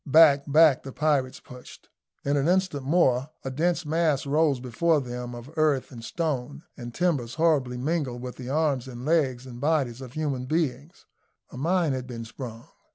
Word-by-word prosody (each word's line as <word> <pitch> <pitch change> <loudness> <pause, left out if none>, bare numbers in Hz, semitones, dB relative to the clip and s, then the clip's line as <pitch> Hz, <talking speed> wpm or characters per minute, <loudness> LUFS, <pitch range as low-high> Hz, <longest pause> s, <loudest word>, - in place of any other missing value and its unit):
Back, 145 -1 +6
back 155 -2 +6
the 135 - -8
pirates 135 -3 0
pushed. 125 -1 -13 0.4
In 140 +1 +1
an 140 +1 +1
instant 185 -5 +1
more 135 -2 +2 0.2
a 135 - -2
dense 170 +5 0
mass 155 -2 +1
rose 145 -1 +2
before 150 +6 +1
them 125 -2 -6
of 120 +4 -10
earth, 150 -4 +1
and 120 -3 -10
stone, 145 0 -3
and 120 -2 -7
timbers, 140 -6 -1
horribly 150 -6 +2
mingled 135 -2 -2
with 125 -1 -7
the 125 -1 -7
arms 140 -4 0
and 125 0 -8
legs 135 -6 +1
and 120 -1 -10
bodies 140 -5 0
of 125 -2 -9
human 140 -5 -2
beings; 150 0 -2 0.5
a - - -9
mine 170 0 +1
had 130 -1 -4
been 115 -2 -6
sprung. 115 +1 -8
140 Hz, 175 wpm, -26 LUFS, 125-155 Hz, 0.5 s, Back